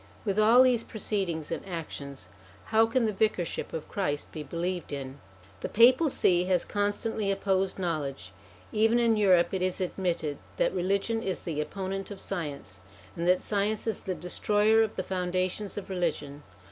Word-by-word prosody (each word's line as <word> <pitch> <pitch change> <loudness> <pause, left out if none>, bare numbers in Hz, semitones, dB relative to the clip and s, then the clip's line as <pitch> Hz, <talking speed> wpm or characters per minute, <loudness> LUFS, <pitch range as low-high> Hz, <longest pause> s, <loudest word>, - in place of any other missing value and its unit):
With 200 0 0
all 230 +4 +7
these 250 -3 +3
proceedings 185 -8 -2
and - - -3
actions, 150 -6 -7 0.5
how 225 +1 +6
can 230 +1 +1
the 215 - 0
Vicarship 195 -4 -1
of 160 - -5
Christ 145 -8 -2
be 155 - -6
believed 175 +3 -3
in? 135 -1 -6 0.4
The - - -4
Papal 255 +8 +6
See 180 -8 +3
has 180 -2 +1
constantly 205 +1 -1
opposed 195 -1 0
knowledge; 150 - -3 0.4
even 225 +2 +3
in 235 -2 +3
Europe 190 -5 +4
it 190 - -1
is 185 +1 -1
admitted 175 -5 -2 0.2
that - - +2
religion 200 +5 0
is 190 -4 -3
the 155 -3 -2
opponent 195 +4 -4
of 200 -2 -8
science, 145 - -5 0.4
and 170 +1 -2
that 180 0 +3
science 210 +1 -1
is 225 -4 -2
the 185 - -3
destroyer 210 +5 +2
of 220 -1 0
the 190 - -2
foundations 185 +2 -2
of 205 - -5
religion. 155 -6 -2
190 Hz, 165 wpm, -28 LUFS, 170-210 Hz, 0.5 s, all